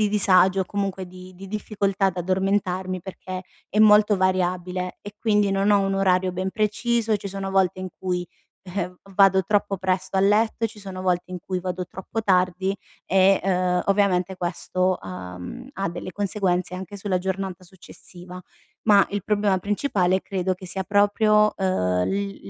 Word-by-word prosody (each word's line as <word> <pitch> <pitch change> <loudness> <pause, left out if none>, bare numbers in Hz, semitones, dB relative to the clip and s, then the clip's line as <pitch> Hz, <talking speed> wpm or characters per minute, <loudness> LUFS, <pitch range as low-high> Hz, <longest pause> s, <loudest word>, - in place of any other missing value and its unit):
di 210 - +3
disagio 190 -2 +4
o - - -7
comunque 195 -2 -3
di- 185 +1 -12
di 195 +2 -10
difficoltà 200 -1 -1
ad 190 -2 -1
addormentarmi 185 0 -1
perché 185 0 -7 0.2
è 210 - -2
molto 210 -1 +6
variabile, 185 -1 -1
e 205 0 -10
quindi 210 -2 +2
non 195 +1 +2
ho 205 - +5
un 195 0 0
orario 185 -1 +2
ben 185 +1 -2
preciso, 220 +1 0
ci 200 0 -7
sono 195 0 -5
volte 190 -1 +2
in 185 - -4
cui, 180 -1 -2 0.4
eh, 180 -1 -4 0.2
vado 190 -1 +5
troppo 205 +1 +1
presto 185 +1 -1
a - - +4
letto, 220 +3 +2
ci 215 -1 -12
sono 190 -2 -7
volte 180 -1 0
in 180 - -5
cui 185 +1 -3
vado 180 0 -4
troppo 190 +5 -5
tardi 190 0 +1 0.3
e, 190 +1 +4
uhm, 180 -1 +1
ovviamente 195 -2 +2
questo, 180 +1 -1
uhm, 90 - -8
ha 195 - -2
delle 170 - -6
conseguenze 185 -3 -1
anche 190 +2 -7
sulla 195 -2 -1
giornata 190 0 -4
successiva. 180 0 -13 0.5
Ma 200 -2 +6
il 205 -1 -3
problema 205 -2 +1
principale 190 -2 0
credo, 185 -1 -2
che 185 +1 -11
sia 190 +2 -3
proprio, 210 +2 +3
uhm, 90 - +1
l 200 0 -3
190 Hz, 165 wpm, -24 LUFS, 185-200 Hz, 0.5 s, molto